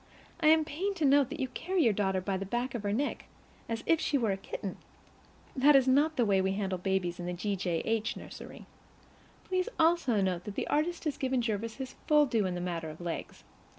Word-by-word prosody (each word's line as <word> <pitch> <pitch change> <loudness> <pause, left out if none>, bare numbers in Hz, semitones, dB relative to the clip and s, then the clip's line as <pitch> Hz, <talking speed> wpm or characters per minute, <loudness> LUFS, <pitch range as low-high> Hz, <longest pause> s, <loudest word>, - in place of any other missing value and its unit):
I 315 - +2
am 315 0 +6
pained 370 +7 -2
to 325 -5 0
note 280 -1 +5
that 315 - -6
you 265 - 0
carry 360 +6 0
your 225 - +4
daughter 190 -2 0
by 195 +1 -2
the 190 - -3
back 240 +5 -2
of 240 - -3
her 205 -1 -1
neck, 270 +8 -1 0.4
as 230 0 -3
if 330 -1 +3
she 285 - +1
were 225 -6 +1
a - - 0
kitten. 195 0 -6 0.8
That 285 +2 +6
is 265 -1 +5
not 290 +4 +3
the 240 - +2
way 195 -2 +3
we 190 0 0
handle 195 -2 -2
babies 180 -2 -1
in 175 - -4
the 180 - -2
J. 200 +3 -2
G. 185 -1 -3 0.2
H. 225 -1 -1
nursery. - - -10 0.8
Please 370 +3 -1
also 320 -9 +3
note 185 -3 -1
that 205 - -6
the - - -2
artist 330 +3 0
has 305 -4 -2
given 260 -1 0
Jervis 225 0 -2
his 265 -1 -6
full 300 -1 +6
due 225 -7 +1
in 180 - -3
the 175 - -3
matter 170 -3 -3
of 155 - -10
legs. 175 -1 -5
230 Hz, 230 wpm, -30 LUFS, 190-295 Hz, 0.8 s, am